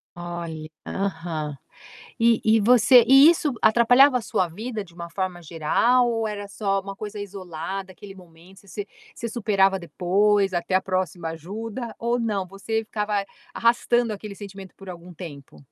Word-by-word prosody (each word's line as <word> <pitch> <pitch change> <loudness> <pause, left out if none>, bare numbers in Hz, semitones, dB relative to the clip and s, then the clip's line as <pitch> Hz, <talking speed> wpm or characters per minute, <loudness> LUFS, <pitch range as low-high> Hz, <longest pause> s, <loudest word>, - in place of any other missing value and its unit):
Olha. 170 -3 -6 0.2
Aham. 160 -6 -4 0.6
E 230 -1 +4
e 220 0 +5
você 245 +2 +6
e 270 +5 +8
isso 310 -5 +1
atrapalhava 245 +4 +5
a - - -4
sua 205 -5 0
vida 215 +6 -5
de 175 -4 -12
uma 170 0 -8
forma 185 -1 -4
geral? 180 +10 +2
Ou 225 -1 -1
era 205 -1 -4
só 200 -1 -1
uma 195 0 -8
coisa 210 0 -7
isolada? 190 -1 -6
Aquele 195 +1 -12
momento? 180 +2 -17
Você 205 +1 -7 0.3
você 235 - -5
superava 200 -4 +2
depois 195 +3 +1
até 175 +1 -2
a 185 - +3
próxima 185 -3 -2
ajuda 215 - -6
ou 235 +1 0
não? 210 -5 -2
Você 220 +4 -3
ficava 210 -2 -2 0.3
arrastando 240 0 +2
aquele 210 0 -8
sentimento 195 -2 -10
por 195 -1 -12
algum 175 0 -10
tempo? 145 -5 -10
195 Hz, 155 wpm, -24 LUFS, 180-225 Hz, 0.6 s, e